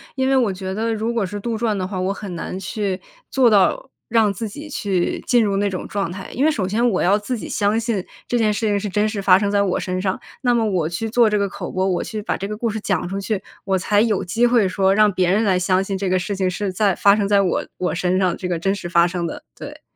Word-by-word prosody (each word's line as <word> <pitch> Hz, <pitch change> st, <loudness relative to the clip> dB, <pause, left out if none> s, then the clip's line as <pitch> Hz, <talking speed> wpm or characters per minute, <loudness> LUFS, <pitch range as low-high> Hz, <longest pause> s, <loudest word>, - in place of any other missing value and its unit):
因 265 Hz, -1 st, +1 dB
为 270 Hz, -, +3 dB
我 235 Hz, -6 st, +2 dB
觉 190 Hz, 0 st, -5 dB
得 225 Hz, +3 st, -1 dB
如 220 Hz, +2 st, -2 dB
果 230 Hz, -4 st, 0 dB
是 205 Hz, +3 st, -5 dB
杜 230 Hz, +1 st, -2 dB
撰 220 Hz, -2 st, 0 dB
的 190 Hz, -2 st, -2 dB
话， 185 Hz, 0 st, -4 dB
我 185 Hz, +2 st, 0 dB
很 200 Hz, -2 st, -7 dB
难 180 Hz, -, -5 dB
去 195 Hz, 0 st, -3 dB, 0.3 s
做 260 Hz, -3 st, +4 dB
到 210 Hz, +5 st, +2 dB, 0.2 s
让 220 Hz, -2 st, +3 dB
自 210 Hz, +3 st, -4 dB
己 295 Hz, +9 st, -9 dB
去 195 Hz, -9 st, -1 dB
进 240 Hz, -2 st, +4 dB
入 200 Hz, -2 st, 0 dB
那 200 Hz, 0 st, +1 dB
种 185 Hz, -2 st, -5 dB
状 200 Hz, -4 st, -2 dB
态。 190 Hz, +2 st, -7 dB
因 270 Hz, -, +1 dB
为 315 Hz, -, +4 dB
首 215 Hz, -11 st, -1 dB
先 220 Hz, +6 st, +1 dB
我 185 Hz, -, 0 dB
要 200 Hz, +4 st, +3 dB
自 240 Hz, +4 st, -3 dB
己 -, -, -7 dB
相 205 Hz, +1 st, +1 dB
信 225 Hz, -5 st, -1 dB, 0.2 s
这 245 Hz, -, +1 dB
件 215 Hz, -2 st, +2 dB
事 215 Hz, +2 st, -2 dB
情 205 Hz, -1 st, +1 dB
是 205 Hz, -, -4 dB
真 210 Hz, +2 st, +1 dB
实 210 Hz, -2 st, -3 dB
发 185 Hz, -1 st, +6 dB
生 200 Hz, 0 st, 0 dB
在 205 Hz, 0 st, +3 dB
我 195 Hz, -3 st, +1 dB
身 185 Hz, 0 st, -2 dB
上， 190 Hz, -1 st, -1 dB, 0.2 s
那 245 Hz, -2 st, +2 dB
么 230 Hz, -2 st, +2 dB
我 185 Hz, -7 st, 0 dB
去 175 Hz, +7 st, -3 dB
做 230 Hz, 0 st, +4 dB
这 210 Hz, -, +1 dB
个 200 Hz, -1 st, 0 dB
口 -, -, -6 dB
播， 185 Hz, +1 st, -1 dB
我 185 Hz, -2 st, 0 dB
去 215 Hz, -, -5 dB
把 210 Hz, -, -2 dB
这 195 Hz, -, -4 dB
个 210 Hz, -, -4 dB
故 230 Hz, +2 st, -2 dB
事 220 Hz, 0 st, -3 dB
讲 195 Hz, -5 st, -1 dB
出 195 Hz, +1 st, -3 dB
去， 200 Hz, 0 st, -3 dB, 0.2 s
我 190 Hz, -1 st, +1 dB
才 205 Hz, +3 st, +1 dB
有 215 Hz, -2 st, +2 dB
机 230 Hz, +7 st, +2 dB
会 235 Hz, -5 st, +3 dB
说 190 Hz, +1 st, +2 dB
让 210 Hz, 0 st, +5 dB
别 185 Hz, -2 st, +1 dB
人 210 Hz, +4 st, +2 dB
来 190 Hz, -4 st, +2 dB
相 185 Hz, +1 st, +2 dB
信 195 Hz, 0 st, -3 dB
这 190 Hz, -1 st, -2 dB
个 185 Hz, -, +2 dB
事 190 Hz, +3 st, -3 dB
情 190 Hz, -1 st, 0 dB
是 190 Hz, +2 st, -2 dB
在 195 Hz, 0 st, +1 dB
发 200 Hz, -, +5 dB
生 205 Hz, -2 st, 0 dB
在 200 Hz, 0 st, +4 dB
我 185 Hz, -3 st, 0 dB
我 180 Hz, -, -1 dB
身 180 Hz, +1 st, 0 dB
上， 185 Hz, -2 st, +1 dB
这 185 Hz, -, -4 dB
个 175 Hz, -1 st, -1 dB
真 195 Hz, +4 st, 0 dB
实 195 Hz, -3 st, -5 dB
发 170 Hz, -1 st, +4 dB
生 175 Hz, -1 st, -2 dB
的， -, -, -7 dB, 0.2 s
对， -, -, -9 dB
200 Hz, 310 characters per minute, -21 LUFS, 185-220 Hz, 0.3 s, 发